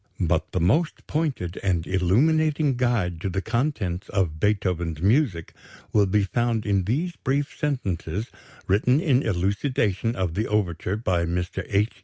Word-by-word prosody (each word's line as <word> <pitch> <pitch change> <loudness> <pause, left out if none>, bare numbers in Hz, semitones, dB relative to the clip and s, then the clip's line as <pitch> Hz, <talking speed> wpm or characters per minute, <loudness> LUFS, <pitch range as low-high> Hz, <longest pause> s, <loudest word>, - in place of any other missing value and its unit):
But 80 -3 0
the 90 - -1
most 120 - +1
pointed 140 - -2
and 90 -4 0
illuminating 145 - +2
guide 110 -9 0
to 95 - -1
the 95 - -1
contents 110 - -2
of 85 -6 -1
Beethoven's 90 -6 0
music 100 - +1 0.4
will 105 -2 +4
be 105 +2 +2
found 115 +2 0
in 100 -3 +1
these 160 - -1
brief 140 +2 -1
sentences 105 - -2 0.4
written 125 +8 +3
in 140 -7 +3
elucidation 105 +2 0
of 90 -3 -1
the 110 +6 -1
overture 95 -2 -1
by 90 -6 0
Mr. 90 +1 -2
H. 105 +2 +1
100 Hz, 145 wpm, -25 LUFS, 90-125 Hz, 0.4 s, will